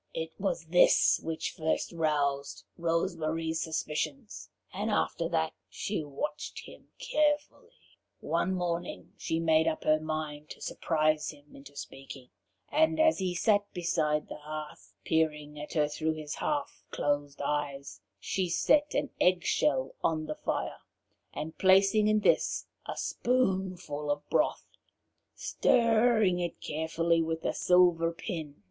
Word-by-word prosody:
It 160 0 -3
was 190 -4 -1
this 175 +2 +5
which 165 -1 -3
first 160 -2 -1
roused 145 -4 -1
Rose 170 +2 0
Marie's 160 0 -2
suspicions, 165 - -3 0.2
and 205 +4 -2
after 170 -5 0
that 160 -2 0 0.2
she 200 -6 -3
watched 150 +1 -5
him - - -14
carefully. 305 -2 0 0.5
One 180 +3 0
morning 175 -1 -3
she 160 - -2
made 160 -1 +3
up 160 - -1
her 155 0 +4
mind 155 -1 -4
to - - -9
surprise 155 -1 0
him 145 -1 -13
into 140 +1 -13
speaking, 135 -2 -9 0.4
and 315 +1 +3
as 315 -4 +4
he 185 -2 -1
sat 205 +2 +2
beside 160 -4 0
the - - -8
hearth, 155 0 -8
peering 150 -2 0
at 150 - -7
her 150 -2 +3
through 155 +2 -1
his 155 -1 -6
half 290 -2 -3
closed 145 -1 -1
eyes, 140 -7 -3 0.2
she 185 - -1
set 290 - +3
an 285 -1 0
egg 180 -1 +3
shell 135 -3 +1
on 155 -1 +1
the 155 - -3
fire, - - -3 0.5
and 160 +1 -6
placing 195 +3 +5
in 215 0 +3
this - - +2 0.2
a - - -5
spoonful 185 - -1
of 145 0 -2
broth, - - +1 0.7
stirred 230 -1 +3
it 175 -1 -3
carefully 165 +2 0
with 165 0 -3
a - - +1
silver 175 -2 +4
pin. 165 -4 -6
160 Hz, 140 wpm, -30 LUFS, 150-185 Hz, 0.7 s, this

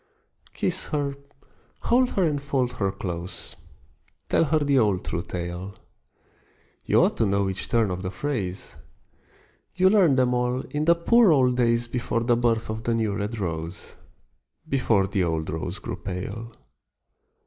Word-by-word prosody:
Kiss - - -1
her, 145 -2 -1 0.7
hold 250 +1 +3
her 195 - +2
and 150 -4 0
fold 135 -3 0
her 100 -2 0
close, 90 -2 -5 0.7
Tell - - +3
her 155 +1 +2
the 140 -3 +3
old 105 -5 +1
true 85 - -2
tale: 90 +2 -5 1.1
You - - +4
ought - - +1
to - - +2
know 100 0 +1
each 95 0 -4
turn 115 -4 +2
of 90 0 -3
the 95 - -3
phrase, 100 -4 -4 1.0
You 185 +1 +4
learned 180 -10 +4
them 125 -1 +3
all 125 +1 0
in 150 +1 -1
the 170 +1 +5
poor 220 +4 +5
old 130 -4 +4
days 120 -1 +2
Before 115 -1 -1
the 120 0 +3
birth 115 -1 +1
of 110 0 -4
the 115 -1 0
new 110 -3 0
red 105 +3 -3
rose, 85 -3 -5 0.7
Before 115 -7 +2
the 95 -1 0
old 80 -2 -1
rose 85 +4 -4
grew - - -6
pale. 100 +5 -6
115 Hz, 160 wpm, -25 LUFS, 95-140 Hz, 1.1 s, the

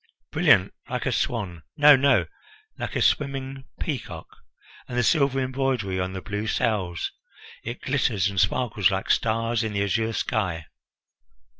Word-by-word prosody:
Brilliant! - - +4 0.2
Like - - -3
a - - +1
swan! 95 -9 -2 0.2
No, 145 0 +8
no, 140 +1 +3 0.5
like - - -5
a - - +2
swimming 135 -1 -1
peacock! 140 -8 -5 0.5
And 125 - -5
the 125 - +3
silver 140 0 +2
embroidery 130 -7 -1
on 95 0 -2
the 95 - -6
blue 105 +1 -4
sails! 95 -9 -1 0.5
It 120 +2 -6
glitters 115 -8 +1
and 100 -1 -2
sparkles 105 0 +2
like 95 0 -1
stars 115 0 +1
in 110 -1 -3
the 100 0 0
azure 110 +3 0
sky." 90 -8 -2
115 Hz, 145 wpm, -25 LUFS, 100-130 Hz, 0.5 s, No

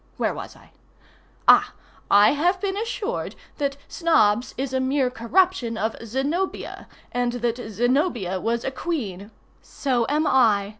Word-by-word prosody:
] - - -35
Where - - 0
was - - -8
I? - - -20 0.8
Ah! - - +6 0.4
I 205 +1 +6
have 350 +6 +1
been 390 -1 -2
assured 450 +1 -3 0.2
that 280 -1 -1
Snobbs 250 - +2
is 265 0 -3
a 260 - +1
mere 260 -1 +1
corruption 250 -1 +1
of 220 0 -1
Zenobia, 280 - -3 0.2
and 245 -1 0
that 240 -1 -1
Zenobia 240 - 0
was 235 +1 -1
a 265 - -2
queen—(So 240 - -4
am 300 +2 +1
I. 220 -8 +3
260 Hz, 140 wpm, -24 LUFS, 230-315 Hz, 0.8 s, Ah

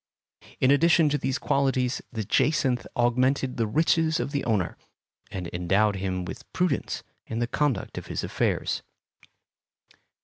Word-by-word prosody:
In 130 - +4
addition 160 +2 +5
to 145 - +1
these 135 +1 -1
qualities 135 -3 +1
the 110 -3 -3
jacinth 130 +2 +1
augmented 125 +2 +2
the 115 -2 +1
riches 160 +5 +2
of 140 - -2
the 140 - -1
owner, 105 -6 0 0.5
and 90 -2 -5
endowed 100 +4 +2
him 95 -1 -2
with 130 +8 -9
prudence 180 -6 -1 0.2
in 115 - -4
the 120 - +1
conduct 130 -4 -1
of - - -12
his - - -3
affairs. - - -1
130 Hz, 140 wpm, -26 LUFS, 110-145 Hz, 0.5 s, addition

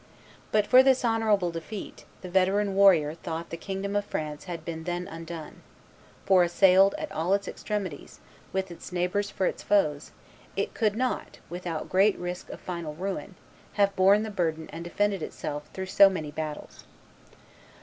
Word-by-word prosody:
But 210 -1 +3
for 255 +4 +8
this 260 -1 +3
honorable 215 -6 +2
defeat, 165 +5 -7 0.2
the 185 - -7
veteran 195 +2 +2
warrior 185 -7 +5
thought 165 0 -6
the - - -3
kingdom 195 +3 -4
of 205 - +2
France 150 -6 -5
had 175 -3 -6
been 160 -1 -5
then 175 0 -3
undone; 165 -1 -8 0.6
for, 190 -2 +5
assailed 190 +2 +5
at - - -5
all 175 +5 +1
its 200 -1 -4
extremities, 195 -8 -5 0.3
with 190 -1 -2
its 170 - -10
neighbors 180 +3 0
for 190 - -1
its - - -2
foes, 155 -8 +1 0.4
it - - -2
could 215 -3 +1
not, 255 +2 -2
without 175 -3 -4
great 195 +3 +3
risk 180 0 -5
of - - -8
final 170 -4 -5
ruin, 190 +2 -4 0.4
have 200 -1 +2
borne 195 +3 +5
the 220 - -5
burden 160 -5 -1
and 165 +1 -6
defended 195 +2 0
itself 150 -1 -5
through 190 - -5
so 195 +1 +7
many 155 -6 -4
battles. 155 0 -6
185 Hz, 165 wpm, -27 LUFS, 165-200 Hz, 0.6 s, for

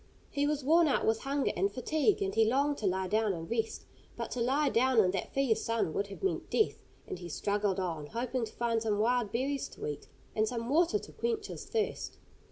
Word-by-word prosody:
He 285 0 +1
was 295 -2 -1
worn 325 +4 +5
out 280 - +1
with 220 0 +2
hunger 275 0 0
and 395 +1 +1
fatigue, 310 - +1
and 195 0 -2
he 225 - +4
longed 280 +6 +2
to 210 - 0
lie 190 0 0
down 215 +1 +2
and 165 -2 -6
rest. 225 -1 -2 0.3
But - - -4
to 250 - -2
lie 275 +4 +2
down 260 +1 +2
in 185 -4 +5
that 190 -1 -3
fierce 270 -5 +1
sun 230 -8 0
would 200 - -1
have 200 - -10
meant 385 - -1
death, 435 - +1 0.2
and - - -6
he 175 -1 -7
struggled 200 +2 0
on, 165 -5 -3
hoping 245 - -2
to - - -11
find 230 -1 0
some 215 -2 0
wild 235 0 +2
berries 270 +3 -1
to - - -8
eat, 145 -1 -5 0.3
and 215 0 +2
some 235 -1 -3
water 340 +7 +3
to - - -10
quench 455 -3 -2
his - - -7
thirst. 445 -2 -2
235 Hz, 225 wpm, -31 LUFS, 205-280 Hz, 0.3 s, worn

